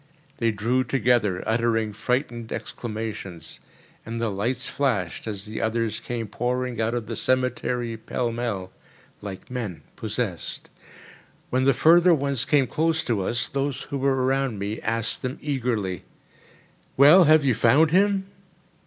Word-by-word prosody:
They 115 Hz, -, +1 dB
drew 115 Hz, +4 st, +1 dB
together, 120 Hz, -6 st, +1 dB
uttering 115 Hz, -1 st, +1 dB
frightened 120 Hz, 0 st, -2 dB
exclamations; 105 Hz, -6 st, -6 dB, 0.4 s
and 115 Hz, +1 st, -5 dB
the 115 Hz, -2 st, 0 dB
lights 120 Hz, +6 st, -1 dB
flashed 115 Hz, -10 st, -1 dB
as 100 Hz, -2 st, -4 dB
the 110 Hz, +1 st, -5 dB
others 115 Hz, 0 st, -1 dB
came 120 Hz, -2 st, -4 dB
pouring 125 Hz, +2 st, -2 dB
out 115 Hz, +2 st, 0 dB
of 120 Hz, -2 st, -3 dB
the 115 Hz, +1 st, -5 dB
cemetery 125 Hz, -2 st, 0 dB
pell 120 Hz, +2 st, -2 dB
mell, 115 Hz, -6 st, -3 dB, 0.5 s
like 100 Hz, +3 st, -8 dB
men 115 Hz, -9 st, -5 dB
possessed. 105 Hz, -4 st, -4 dB, 0.8 s
When 130 Hz, +1 st, +2 dB
the 135 Hz, -2 st, +4 dB
further 170 Hz, +3 st, +6 dB
ones 140 Hz, -4 st, 0 dB
came 145 Hz, -3 st, +3 dB
close 160 Hz, +6 st, 0 dB
to 115 Hz, -5 st, 0 dB
us, 120 Hz, +6 st, 0 dB
those 140 Hz, -1 st, -2 dB
who 140 Hz, -, -2 dB
were 135 Hz, -1 st, +1 dB
around 135 Hz, -3 st, 0 dB
me 100 Hz, +2 st, -4 dB
asked 115 Hz, 0 st, -2 dB
them 130 Hz, +1 st, -3 dB
eagerly: 120 Hz, -, -2 dB, 0.9 s
"Well, 155 Hz, +7 st, +8 dB
have 155 Hz, -1 st, +5 dB
you 130 Hz, -, +4 dB
found 140 Hz, +8 st, +4 dB
him?" 195 Hz, +1 st, +3 dB
120 Hz, 145 wpm, -25 LUFS, 110-135 Hz, 0.9 s, Well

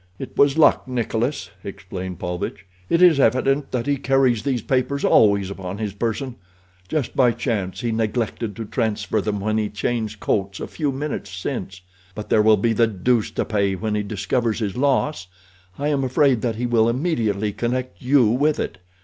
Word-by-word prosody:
"It 135 Hz, -, -8 dB
was 140 Hz, +1 st, +4 dB
luck, 150 Hz, -3 st, +4 dB
Nikolas," 120 Hz, +2 st, -2 dB
explained 95 Hz, -2 st, -6 dB
Paulvitch. 90 Hz, +3 st, -4 dB, 0.2 s
"It 170 Hz, +2 st, +4 dB
is 165 Hz, -5 st, +6 dB
evident 135 Hz, +3 st, +2 dB
that 125 Hz, -2 st, -1 dB
he 145 Hz, 0 st, +1 dB
carries 130 Hz, -4 st, +2 dB
these 125 Hz, 0 st, -1 dB
papers 135 Hz, +2 st, 0 dB
always 100 Hz, -2 st, +4 dB
upon 95 Hz, 0 st, -6 dB
his 105 Hz, -2 st, -3 dB
person—just 100 Hz, -, -5 dB
by 125 Hz, -3 st, +4 dB
chance 105 Hz, -6 st, -2 dB
he 120 Hz, -, -1 dB
neglected 110 Hz, -1 st, -2 dB
to 115 Hz, -, -5 dB
transfer 110 Hz, -1 st, -1 dB
them 105 Hz, 0 st, -2 dB
when 110 Hz, +2 st, 0 dB
he 105 Hz, -1 st, -1 dB
changed 110 Hz, 0 st, -3 dB
coats 100 Hz, -2 st, -1 dB
a -, -, -4 dB
few 150 Hz, -3 st, -2 dB
minutes 135 Hz, -6 st, -4 dB
since. 90 Hz, +1 st, -5 dB, 0.3 s
But 105 Hz, -, -7 dB
there 110 Hz, -, +4 dB
will 110 Hz, 0 st, +5 dB
be 115 Hz, +3 st, +1 dB
the 115 Hz, +1 st, +3 dB
deuce 110 Hz, +2 st, +1 dB
to -, -, -2 dB
pay 100 Hz, -3 st, 0 dB
when 110 Hz, +3 st, -3 dB
he 105 Hz, -, 0 dB
discovers 110 Hz, +3 st, -1 dB
his 105 Hz, -4 st, -3 dB
loss. 140 Hz, -5 st, 0 dB, 0.5 s
I 145 Hz, +1 st, -1 dB
am 140 Hz, -2 st, +1 dB
afraid 130 Hz, -2 st, +2 dB
that 115 Hz, -3 st, -1 dB
he 120 Hz, +3 st, -2 dB
will 115 Hz, -1 st, +3 dB
immediately 115 Hz, -, 0 dB
connect 125 Hz, +3 st, -3 dB
you 130 Hz, 0 st, +4 dB
with 145 Hz, +7 st, +2 dB
it. -, -, -4 dB
115 Hz, 180 wpm, -22 LUFS, 100-130 Hz, 0.5 s, is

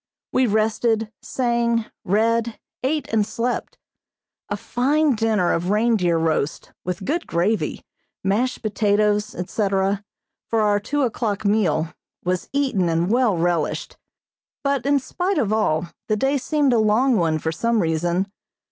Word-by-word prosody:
We 255 Hz, -1 st, +3 dB
rested, 220 Hz, +1 st, +1 dB
sang, 235 Hz, -2 st, 0 dB, 0.2 s
read, 225 Hz, +3 st, +1 dB, 0.2 s
ate 295 Hz, +4 st, -1 dB
and 220 Hz, -1 st, +4 dB
slept. 235 Hz, +3 st, -3 dB, 0.7 s
A -, -, -2 dB
fine 285 Hz, +4 st, +1 dB
dinner 215 Hz, -5 st, +1 dB
of 175 Hz, +2 st, -1 dB
reindeer 210 Hz, -5 st, +2 dB
roast, 160 Hz, -2 st, -1 dB
with 180 Hz, +1 st, -4 dB
good 335 Hz, +5 st, -1 dB
gravy, 190 Hz, +6 st, 0 dB, 0.4 s
mashed 225 Hz, +7 st, 0 dB
potatoes, 210 Hz, 0 st, +1 dB
etc., 195 Hz, +1 st, 0 dB, 0.4 s
for 225 Hz, -1 st, +1 dB
our 205 Hz, -1 st, +3 dB
two 285 Hz, +7 st, -1 dB
o'clock 215 Hz, -3 st, -1 dB
meal, 175 Hz, -6 st, +1 dB, 0.3 s
was 180 Hz, 0 st, -1 dB
eaten 260 Hz, -11 st, +1 dB
and 165 Hz, +3 st, +1 dB
well 240 Hz, -6 st, +3 dB
relished; 170 Hz, -2 st, -1 dB, 0.7 s
but 275 Hz, -2 st, 0 dB
in 285 Hz, 0 st, +4 dB
spite 360 Hz, +8 st, -2 dB
of 215 Hz, -1 st, +1 dB
all 170 Hz, -6 st, +1 dB, 0.2 s
the 215 Hz, -, +1 dB
day 270 Hz, +5 st, +1 dB
seemed 285 Hz, 0 st, +1 dB
a 235 Hz, -, +4 dB
long 225 Hz, +5 st, +3 dB
one 165 Hz, -5 st, +2 dB
for 160 Hz, +1 st, -2 dB
some 230 Hz, +7 st, +1 dB
reason. 170 Hz, +2 st, +1 dB
215 Hz, 140 wpm, -22 LUFS, 185-240 Hz, 0.7 s, and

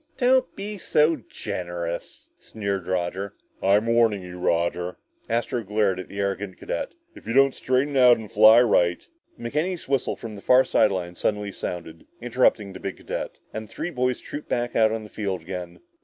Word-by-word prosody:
"Don't 260 Hz, 0 st, +3 dB
be 205 Hz, +1 st, -6 dB
so 155 Hz, -1 st, +3 dB
generous," 85 Hz, -7 st, -6 dB
sneered 100 Hz, -4 st, -4 dB
Roger. 95 Hz, +2 st, -2 dB, 0.3 s
"I'm 100 Hz, +3 st, +3 dB
warning 115 Hz, -4 st, +3 dB
you, 90 Hz, 0 st, -9 dB
Roger" 85 Hz, +1 st, 0 dB, 0.3 s
Astro 120 Hz, +1 st, -1 dB
glared 105 Hz, -2 st, +1 dB
at 95 Hz, -, -6 dB
the 100 Hz, -, -8 dB
arrogant 100 Hz, -1 st, -2 dB
cadet 85 Hz, -, -4 dB, 0.2 s
"if -, -, -14 dB
you 115 Hz, -, -1 dB
don't 135 Hz, 0 st, +5 dB
straighten 130 Hz, +3 st, 0 dB
out 125 Hz, -2 st, +7 dB
and 110 Hz, -2 st, -9 dB
fly 110 Hz, +3 st, +8 dB
right 85 Hz, -7 st, +2 dB, 0.2 s
" -, -, -33 dB
McKenny's 155 Hz, +9 st, -2 dB
whistle 135 Hz, -2 st, 0 dB
from 110 Hz, -2 st, -8 dB
the 100 Hz, -, -10 dB
far 130 Hz, +4 st, +6 dB
side 110 Hz, -, +3 dB
lines 90 Hz, -3 st, -4 dB
suddenly 105 Hz, -1 st, -1 dB
sounded, 85 Hz, -4 st, -6 dB
interrupting 120 Hz, -4 st, +1 dB
the 95 Hz, -, -8 dB
big 95 Hz, -, -5 dB
cadet, -, -, -5 dB, 0.2 s
and 110 Hz, 0 st, -5 dB
the -, -, -21 dB
three 175 Hz, -, -4 dB
boys 125 Hz, -3 st, 0 dB
trooped 150 Hz, -, -8 dB
back 120 Hz, 0 st, -1 dB
out 110 Hz, -1 st, +4 dB
on 110 Hz, 0 st, -3 dB
the -, -, -9 dB
field 100 Hz, -4 st, -3 dB
again. 90 Hz, 0 st, -7 dB
105 Hz, 185 wpm, -25 LUFS, 95-125 Hz, 0.3 s, fly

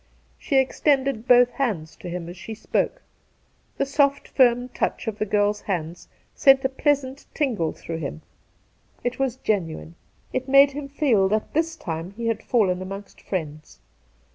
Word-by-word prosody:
She 290 Hz, -, -2 dB
extended 265 Hz, -2 st, +1 dB
both 245 Hz, -1 st, +6 dB
hands 195 Hz, -, -2 dB
to 180 Hz, -, -8 dB
him 175 Hz, -1 st, -5 dB
as 175 Hz, -, -8 dB
she 205 Hz, +4 st, -8 dB
spoke. 220 Hz, -, -1 dB, 0.7 s
The 275 Hz, -, +1 dB
soft 280 Hz, 0 st, +1 dB
firm 245 Hz, -1 st, +3 dB
touch 250 Hz, -, -2 dB
of 220 Hz, -2 st, -4 dB
the 215 Hz, -, -1 dB
girl's 205 Hz, +1 st, +1 dB
hands 175 Hz, -3 st, -4 dB, 0.3 s
sent 270 Hz, 0 st, +5 dB
a -, -, +3 dB
pleasant 275 Hz, 0 st, -1 dB
tingle 225 Hz, -, 0 dB
through 165 Hz, -1 st, -6 dB
him. 155 Hz, +1 st, -6 dB, 0.8 s
It 245 Hz, +1 st, -2 dB
was 265 Hz, -3 st, 0 dB
genuine. 170 Hz, -9 st, -2 dB, 0.4 s
It 255 Hz, +1 st, -2 dB
made 275 Hz, +1 st, +7 dB
him 280 Hz, 0 st, -6 dB
feel 245 Hz, -9 st, +2 dB
that 215 Hz, +1 st, -1 dB
this 325 Hz, +1 st, 0 dB
time 170 Hz, -, -5 dB
he 235 Hz, -, -4 dB
had 225 Hz, -, -1 dB
fallen 190 Hz, -7 st, +1 dB
amongst 195 Hz, +2 st, -8 dB
friends. 155 Hz, -, -5 dB
230 Hz, 160 wpm, -24 LUFS, 185-270 Hz, 0.8 s, made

